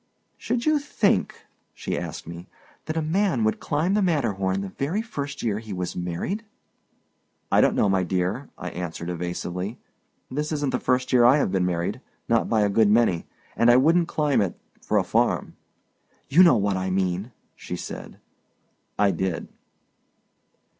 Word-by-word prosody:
"Should 240 -1 -2
you 310 -1 +3
think," 255 -8 0 0.3
she - - -3
asked - - -5
me, 85 +2 -9 0.4
"that 155 +1 -3
a 160 - 0
man 165 - +1
would 110 - +1
climb 160 +6 0
the 210 - +2
Matterhorn 105 - 0
the 100 - -5
very 160 - -2
first 145 -9 -5
year 105 -2 0
he 110 -2 -7
was 90 -1 -4
married?" 90 - -3 1.1
"I - - +5
don't - - +3
know, - - +3
my 95 -1 +2
dear," 95 - -2
I 90 - -5
answered, 85 -1 -5
evasively; 90 +4 -4 0.5
"this 150 +4 -2
isn't 145 -3 -1
the - - 0
first 125 0 0
year 125 -1 +6
I 125 +4 +7
have 140 - +1
been 90 -2 +1
married, 90 +7 -2 0.3
not 115 0 +2
by 110 -2 +3
a 105 - +3
good 105 +1 +4
many, 105 -6 +2 0.3
and 120 - +4
I 120 - +7
wouldn't 165 +5 +4
climb 150 -7 +1
it—for 95 -4 -3
a - - +3
farm." - - 0 0.7
"You 165 +7 +6
know 170 -9 +7
what 100 -2 0
I 95 0 -2
mean," 95 +4 -1 0.2
she - - -6
said. - - -8 0.8
I 100 -1 +4
did. 95 0 -3
110 Hz, 165 wpm, -25 LUFS, 95-150 Hz, 1.1 s, I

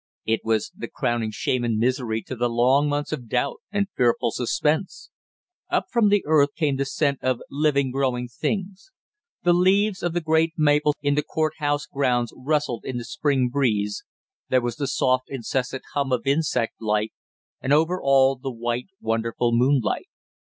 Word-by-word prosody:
It 115 0 +1
was 110 -1 0
the - - -6
crowning 120 -2 -1
shame 120 +3 -1
and 115 -2 0
misery 115 -1 0
to 130 - -6
the 120 0 0
long 130 +5 +3
months 145 0 -2
of 120 -3 -5
doubt 130 +4 0
and 200 -1 +1
fearful 120 -1 +2
suspense. 150 - -1 0.6
Up - - +1
from 230 -4 +3
the 205 -1 +3
earth 145 -2 +3
came 145 -5 0
the 140 - 0
scent 140 0 0
of 130 -2 0
living 140 -2 +1
growing 125 -2 -1
things. 195 - -4 0.5
The 175 0 +4
leaves 190 +3 +3
of 175 -1 -1
the 175 - +1
great 160 0 +2
maples 150 -1 +3
in 145 0 +2
the 150 - +2
court 155 +1 -1
house 145 -1 0
grounds 125 -4 0
rustled 145 -3 -1
in 130 - -4
the 120 - -5
spring 130 +1 0
breeze, 105 -6 0 0.5
there 130 - +4
was 120 -1 -3
the 140 - -2
soft 130 -1 +1
incessant 130 0 -3
hum 140 -2 -1
of 125 +1 0
insect 135 -6 0
life, 105 0 0 0.5
and 130 - -2
over 160 +5 +3
all 135 0 +4
the 130 +1 -5
white 120 +1 -3
wonderful 115 +1 0
moonlight. 125 0 +2
135 Hz, 170 wpm, -24 LUFS, 120-150 Hz, 0.6 s, The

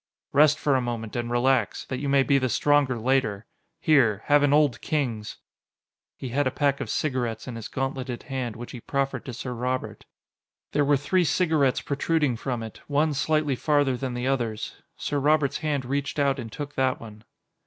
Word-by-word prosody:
"Rest 150 +1 +5
for 145 - +1
a 130 - +2
moment 115 -3 -4
and 120 -1 -2
relax, 130 +2 +1
that 130 - -4
you 140 0 -2
may 140 -1 +4
be 140 0 +3
the 130 -1 0
stronger 145 +1 +2
later. 115 -4 0 0.3
Here 125 - +3
have 145 0 +5
an 145 -1 +3
Old 145 -5 +3
Kings." 120 -9 -2 0.8
He 130 - -6
had 140 +3 +1
a - - +3
pack 140 +1 0
of - - -4
cigarettes 120 -6 -2
in 125 - -5
his 115 -2 -6
gauntleted 130 -2 -3
hand, 130 -5 -4
which 120 +1 -8
he 120 - -8
profferred 135 -2 -2
to 130 - -6
Sir 125 +2 -5
Robert. 125 +2 -3 0.7
There 145 - +2
were 145 0 +4
three 145 +7 +1
cigarettes 155 -6 +2
protruding 145 -2 0
from 120 0 -3
it, 110 - -9
one 150 +1 +2
slightly 145 0 +1
farther 145 -1 +2
than 125 -1 -4
the 125 +1 -3
others. 120 -5 -2 0.2
Sir 145 - -2
Robert's 145 -1 +2
hand 145 -4 -1
reached 140 +3 -2
out 140 -1 +2
and 115 -3 -6
took 145 +3 -6
that 130 -1 +1
one. 110 -1 -11
135 Hz, 190 wpm, -26 LUFS, 120-145 Hz, 0.8 s, Rest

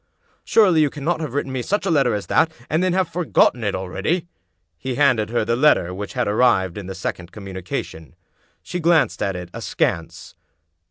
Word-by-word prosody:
"Surely 185 -8 +4
you 150 - +3
cannot 155 +4 -2
have 150 -5 -5
written 140 -2 -1
me 130 -1 -2
such 205 - -1
a 190 - +1
letter 135 -8 +3
as 100 -2 -4
that, 160 - +2 0.2
and 160 +2 +2
then 185 0 +2
have 185 -1 +1
forgotten 165 -7 +2
it 100 - -1
already? 150 - -2 0.3
" - - -50
He 130 -1 -3
handed 125 -7 +3
her 115 -2 0
the 115 +1 +1
letter 120 - +3
which 100 +2 -6
had 125 -3 -1
arrived 105 -5 +2
in 100 -3 -7
the 95 - -6
sec 95 - -3
ond 90 0 -12
communication. 95 - -6 0.5
She 180 - -4
glanced 165 -2 +2
at 100 -2 -1
it, 90 -1 -7
askance. 85 -1 -3
125 Hz, 200 wpm, -21 LUFS, 95-160 Hz, 0.5 s, Surely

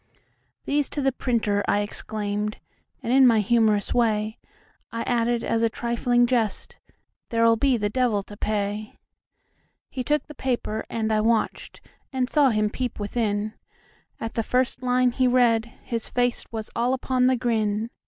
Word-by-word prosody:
"These 290 0 0
to - - +1
the 270 - +3
printer," 220 -5 0
I 205 - +2
exclaimed, 210 0 -3 0.5
And, 235 - 0
in 265 -1 +7
my 230 -2 +5
humorous 215 -1 +2
way,I 225 0 -3
added 240 -1 0
(as 230 - 0
a 230 - +3
trifling 240 +1 +1
jest,)"There 230 0 -3
'll 230 - +5
be 260 +2 +2
the 205 -2 -1
devil 230 -5 +1
to 205 - -12
pay."He 210 +4 -6
took 295 +4 0
the 300 - -11
paper, 245 -5 -2
and 220 -1 -1
I 215 - +2
watched, 225 0 -1 0.3
And 255 -2 -1
saw 290 -3 +5
him 215 -2 +1
peep 250 -2 -4
within; 210 0 -1 0.7
At 225 - -4
the 230 - 0
first 250 +2 0
line 250 0 +2
he 255 +1 +2
read, 240 -2 +3 0.2
his 230 -2 -4
faceWas 240 -3 -2
all 245 +3 +1
upon 255 -1 +1
the 260 - +4
grin. 225 -2 -1
230 Hz, 150 wpm, -25 LUFS, 215-250 Hz, 0.7 s, in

